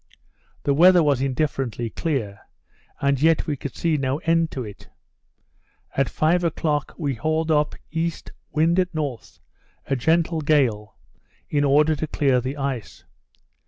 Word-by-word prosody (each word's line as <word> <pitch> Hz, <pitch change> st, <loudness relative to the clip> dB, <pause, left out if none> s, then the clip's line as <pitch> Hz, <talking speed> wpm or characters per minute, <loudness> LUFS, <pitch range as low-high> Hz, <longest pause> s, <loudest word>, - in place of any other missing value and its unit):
The 140 Hz, -, +2 dB
weather 175 Hz, +3 st, +6 dB
was 140 Hz, -4 st, +2 dB
indifferently 135 Hz, -4 st, -2 dB
clear; 120 Hz, -, -3 dB, 0.6 s
and 140 Hz, -1 st, +1 dB
yet 160 Hz, 0 st, +3 dB
we 150 Hz, -, -1 dB
could 140 Hz, 0 st, -7 dB
see 165 Hz, -2 st, 0 dB
no 135 Hz, 0 st, -1 dB
end 165 Hz, 0 st, +2 dB
to 130 Hz, -, -5 dB
it. 105 Hz, -3 st, -11 dB, 1.1 s
At 135 Hz, -1 st, +1 dB
five 170 Hz, +3 st, +1 dB
o'clock 150 Hz, -3 st, -1 dB
we 145 Hz, -4 st, -1 dB
hauled 155 Hz, +5 st, -1 dB
up 150 Hz, -1 st, +1 dB, 0.2 s
east, 165 Hz, +1 st, -3 dB, 0.2 s
wind 165 Hz, +4 st, +2 dB
at 180 Hz, -2 st, -1 dB
north, 140 Hz, -7 st, -5 dB, 0.5 s
a 135 Hz, -, 0 dB
gentle 160 Hz, +4 st, +1 dB
gale, 125 Hz, -9 st, +1 dB, 0.5 s
in 145 Hz, -1 st, +2 dB
order 150 Hz, +3 st, +4 dB
to 155 Hz, +2 st, -3 dB
clear 135 Hz, -4 st, +1 dB
the 130 Hz, +4 st, -4 dB
ice. 135 Hz, -5 st, -4 dB
150 Hz, 145 wpm, -23 LUFS, 135-160 Hz, 1.1 s, weather